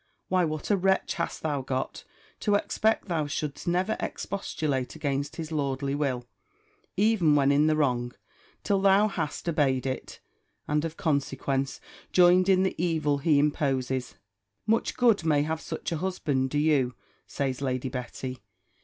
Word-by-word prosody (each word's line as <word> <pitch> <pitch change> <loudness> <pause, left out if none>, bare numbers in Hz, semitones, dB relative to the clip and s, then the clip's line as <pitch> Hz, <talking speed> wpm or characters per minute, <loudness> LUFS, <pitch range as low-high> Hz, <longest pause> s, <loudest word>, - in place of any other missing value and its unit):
Why, 185 -1 +3
what 155 +4 -3
a 205 - +4
wretch 190 +1 +1
hast 170 -2 -4
thou 145 -3 -1
got, 130 0 -4 0.3
to 205 - +2
expect 220 +1 +1
thou 160 -5 -1
shouldst 150 +3 -4
never 185 +5 +1
expostulate 150 -10 -3
against 140 -2 -2
his 160 -1 -6
lordly 140 -2 -1
will, 135 -4 -1 0.7
even 195 -7 +4
when 140 -1 +4
in 145 +2 +4
the 155 - +3
wrong, 125 -5 0 0.5
till 200 -2 +1
thou 200 +2 +5
hast 155 -3 -4
obeyed 140 -6 +1
it, 130 0 -4 0.5
and 150 +1 +1
of 160 0 -5
consequence, 135 -2 -1 0.3
joined 180 +1 +5
in 190 -1 +5
the 190 - +1
evil 155 -4 +1
he 150 +1 +3
imposes! 135 -4 0 0.5
Much 225 +2 +1
good 230 -7 +4
may 150 -2 +2
such 160 - -5
a 165 - -1
husband 150 -7 -1
do 145 - -2
you, 145 -5 +2 0.3
says 135 -2 -2
Lady 130 -1 -1
Betty! 125 0 -5
150 Hz, 150 wpm, -27 LUFS, 135-175 Hz, 0.7 s, thou